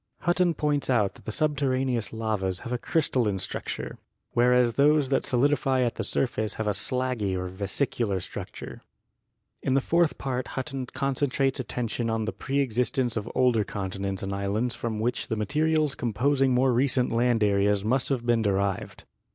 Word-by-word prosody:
Hutton 175 0 +2
points 145 -2 0
out 105 -6 +2
that - - -18
the - - -3
62 - - -7
GEOLOGY 155 -1 +2 0.2
subterraneous 125 -5 -1
lavas 105 -5 -2
have 120 - -5
a 125 - -1
crystalline 120 -11 +1
structure, - - -4 0.3
whereas 125 0 +4
those 145 +1 +3
that 135 - +1
solidify 135 0 +2
at 120 - 0
the - - -4
surface 110 -5 -1
have 110 - -3
a 105 - +2
slaggy 115 -2 0
or 90 0 -3
vesicular 100 +2 -1
structure. - - -7 0.8
In 130 - +1
the - - +5
fourth 170 +4 +2
part 130 -2 -3
Hutton 130 0 -3
concentrates 135 +1 0
attention 120 -2 -2
on 110 -1 -1
the 110 - -3
preexistence 130 -2 0
of 110 0 -3
older 125 -4 +3
continents 95 -1 -4
and 95 0 -3
islands 100 +5 -1
from 115 -3 -3
which 120 +3 -1
the 110 - -1
materials 150 +6 +1
composing 130 +4 +1
more 125 +1 +3
recent 125 0 +2
land 115 -1 +2
areas 100 0 +2
must 125 +3 +1
have 125 -4 -1
been 120 -1 +3
derived. 100 -2 -1
120 Hz, 165 wpm, -27 LUFS, 105-135 Hz, 0.8 s, the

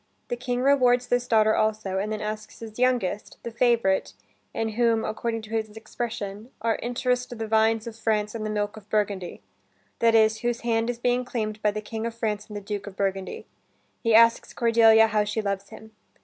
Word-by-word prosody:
The 245 - -1
king 245 0 -2
rewards 250 -3 +4
this 245 0 0
daughter, 220 -2 +4
also, 215 -3 0
and 210 +2 -2
then 215 -1 -3
asks 215 0 -5
his 225 0 -9
youngest, 245 -6 0
the 235 - -5
favorite, 235 -5 +1 0.4
in 225 - -2
whom, 230 0 +1
according 225 +1 -3
to 215 - -11
his 220 -1 -1
expression, 220 -1 -5
are 225 +1 0
"interess'd 250 0 -1
the 225 - -3
vines 220 0 +2
of 230 -2 -7
France 215 -2 -1
and 225 -2 -4
the 215 - -2
milk 205 0 -2
of 210 -1 -14
Burgundy," 200 -4 -2 0.6
that 230 -1 +4
is, 220 0 +4
whose 240 0 -2
hand 230 0 0
is 245 - -2
being 245 +1 +1
claimed 215 -3 -4
by 210 - +3
the 215 +1 -3
King 220 +1 -4
of 230 - -6
France 215 -3 -2
and 210 - -7
the - - -6
Duke 205 0 -5
of 200 - -8
Burgundy, 195 -1 -2 0.6
he 230 -3 +3
asks 230 +1 +5
Cordelia 225 -1 +5
how 215 -1 +1
she 210 +2 -3
loves 200 -2 -3
him. 220 0 -12
220 Hz, 200 wpm, -25 LUFS, 210-235 Hz, 0.6 s, asks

